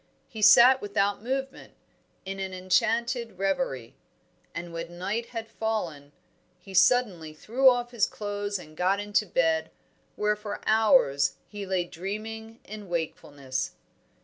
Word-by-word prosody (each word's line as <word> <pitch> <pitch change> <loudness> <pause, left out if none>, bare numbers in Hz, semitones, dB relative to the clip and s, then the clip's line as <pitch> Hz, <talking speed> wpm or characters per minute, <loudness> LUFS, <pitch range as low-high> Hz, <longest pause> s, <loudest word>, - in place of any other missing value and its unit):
He 220 -5 -8
sat 240 +5 +8
without 200 0 0
movement, 265 +3 -4 0.5
in 195 0 -5
an 190 -1 -4
enchanted 225 +5 0
reverie. 195 - -2 0.6
And 170 0 -6
when 170 +1 -6
night 210 +6 -2
had 225 -2 -6
fallen, 175 -12 -3 0.5
he 190 +2 -13
suddenly 185 -5 +3
threw 255 +11 +4
off 245 -1 0
his 235 -4 +2
clothes 205 -1 -4
and 155 -4 -13
got 185 +4 +1
into 205 +1 0
bed, 160 -2 +1 0.5
where 210 0 +1
for 210 -1 -6
hours 215 - +4
he 205 -2 -8
lay 185 -1 +1
dreaming 220 +6 -7
in 210 -2 -9
wakefulness. 145 -5 -4
205 Hz, 130 wpm, -27 LUFS, 175-225 Hz, 0.6 s, sat